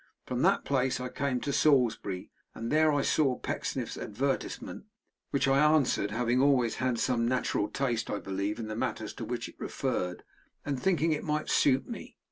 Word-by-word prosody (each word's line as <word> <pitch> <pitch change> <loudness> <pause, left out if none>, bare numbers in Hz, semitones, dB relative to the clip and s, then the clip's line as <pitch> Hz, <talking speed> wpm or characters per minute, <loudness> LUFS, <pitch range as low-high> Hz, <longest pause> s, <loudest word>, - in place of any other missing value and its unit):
From - - -2
that - - +3
place 130 -2 +1
I 125 0 -4
came 130 -1 -1
to 140 - -2
Salisbury, 115 -11 +2 0.2
and 115 +1 -4
there 155 +1 +4
I 145 -1 +1
saw 135 -5 +2
Pecksniff's - - -3
advertisement, 135 - -3 0.4
which 140 - +1
I 135 0 +4
answered, 150 -9 +3
having 120 +3 +1
always 130 -5 +3
had 130 -2 0
some 115 -1 +1
natural 125 -4 0
taste, 120 -3 -1
I - - -1
believe, 100 +1 -3
in 115 - -4
the 110 - -4
matters - - -3
to - - -6
which - - -3
it - - -15
referred, 90 -1 -2 0.4
and 140 -3 -2
thinking 165 -4 +2
it 150 - -1
might 150 0 -1
suit 135 -1 +3
me. 235 - -8
130 Hz, 180 wpm, -30 LUFS, 115-140 Hz, 0.4 s, there